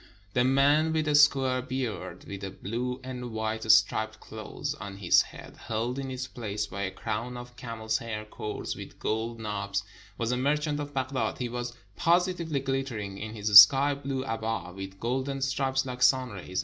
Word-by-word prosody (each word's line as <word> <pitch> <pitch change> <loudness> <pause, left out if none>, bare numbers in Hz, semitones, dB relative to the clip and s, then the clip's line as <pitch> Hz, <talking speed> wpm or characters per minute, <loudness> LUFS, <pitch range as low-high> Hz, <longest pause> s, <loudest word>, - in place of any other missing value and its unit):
The 125 - +3
man 145 +5 +4
with 155 -1 0
a 150 - +2
square 135 -3 +4
beard, 130 -2 -4
with 100 0 -7
a 95 - -3
blue 120 +7 -4
and 125 -1 -6
white 110 0 0
striped 110 +1 +3
cloth - - -5
on 100 0 -7
his 95 -3 +5
head, - - -10
held 115 +3 -2
in 135 -1 -4
its 130 0 -4
place 105 -5 -4
by 100 0 -6
a 95 - -1
crown 110 +5 -4
of 120 0 -10
camel's 115 -2 -3
hair 110 -2 -5
cords 105 0 -5
with - - -10
gold 115 +2 -2
knobs, 100 -2 -2 0.3
was 115 0 -1
a 125 - +1
merchant 150 +3 0
of 145 -1 -6
Baghdad; 130 -4 -1
he 125 -1 -3
was 120 0 -4 0.2
positively 170 -4 +1
ghttering 130 -8 -3
in 110 +1 -6
his 105 -1 -1
sky 140 +7 +4
blue 135 -1 -4
abba 110 -7 -3
with 95 0 -8
golden 130 +3 -2
stripes 135 0 0
like 125 -1 -6
sun 130 0 +4
rays. 95 -2 -5
120 Hz, 180 wpm, -28 LUFS, 110-135 Hz, 0.3 s, his